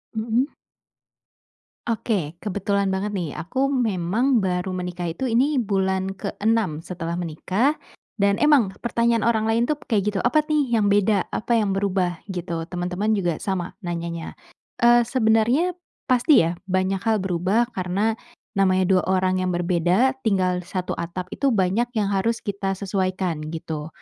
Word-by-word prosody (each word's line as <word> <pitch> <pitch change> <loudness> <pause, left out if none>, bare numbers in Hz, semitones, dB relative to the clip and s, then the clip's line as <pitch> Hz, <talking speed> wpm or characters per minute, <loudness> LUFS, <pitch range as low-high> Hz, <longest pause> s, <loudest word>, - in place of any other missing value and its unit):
Mmm? 230 +5 0 1.4
Oke. 200 -8 -1
Kebetulan 200 -1 0
banget 200 +2 -2
nih, 170 -6 -2
aku 265 +11 -1
memang 225 +1 +1
baru 185 0 -1
menikah 180 -1 -4
itu 260 +4 -2
ini 270 +6 +3
bulan 190 -2 0
ke-6 200 -4 -1
setelah 170 -2 -4
menikah 185 - 0 0.4
dan 200 0 +3
emang 265 -11 +4
pertanyaan 235 -1 +1
orang 220 -2 +2
lain 225 +1 +2
tuh 295 +4 -1
kayak 210 -3 +1
gitu, 195 - -2
"Apa 300 +8 +3
nih 285 -6 +2
yang 205 -2 +2
beda? 205 -1 +3
Apa 235 +2 0
yang 210 -3 +2
berubah?" 190 -3 0
Gitu. 170 -3 -4
Teman-teman 180 +4 -1
juga 175 -5 -1
sama 190 -3 -3
nanyanya. 170 -3 -5 0.5
Eee, 240 0 +6
sebenarnya 245 +7 +2 0.4
pasti 255 - +5
ya 170 +1 -2
banyak 185 +1 0
hal 220 -2 +2
berubah 190 +6 +1
karena 200 +3 -1 0.4
namanya 185 -1 +3
2 185 0 +3
orang 185 0 +2
yang 185 -1 0
berbeda 180 +9 +2
tinggal 185 -4 +2
di 180 - -10
1 185 -1 -3
atap 180 +2 -5
itu 275 -3 +1
banyak 195 +3 +2
yang 205 -2 +1
harus 225 +4 0
kita 200 -2 -2
sesuaikan, 185 -3 -2 0.2
gitu. 160 -2 -5
195 Hz, 145 wpm, -23 LUFS, 180-225 Hz, 1.4 s, Eee